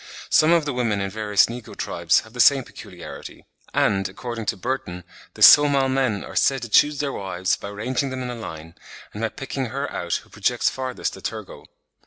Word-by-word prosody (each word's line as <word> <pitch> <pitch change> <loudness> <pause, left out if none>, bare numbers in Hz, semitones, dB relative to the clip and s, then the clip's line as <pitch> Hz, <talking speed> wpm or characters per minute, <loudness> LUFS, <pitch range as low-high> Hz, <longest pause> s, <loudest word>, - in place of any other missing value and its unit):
Some 155 +1 +5
of 170 -3 +3
the 145 - -2
women 115 -5 0
in 100 0 -3
various 105 -1 +3
negro 120 -1 -8
tribes 85 -1 +1
have 110 - -17
the 125 - -10
same 135 +2 +6
peculiarity; 90 -7 -11 0.3
and, 95 -2 +1
according 115 +2 -6
to - - -1
Burton, 95 -6 -4 0.3
the - - 0
Somal 140 -2 +7
men 130 -7 0
are - - -10
said 135 -2 +2
to 120 - -6
choose 145 +6 +4
their 140 -2 -2
wives 95 -2 -1
by - - -9
ranging 120 +6 -2
them 130 -1 -5
in 125 - -4
a - - -5
line, 80 -8 -8 0.4
and 105 - -6
by 115 - 0
picking 135 +1 -5
her 140 +4 -4
out 85 -1 -2
who - - -24
projects - - 0
farthest 130 -1 -4
a - - -12
tergo. - - -7
120 Hz, 205 wpm, -23 LUFS, 100-135 Hz, 0.4 s, Somal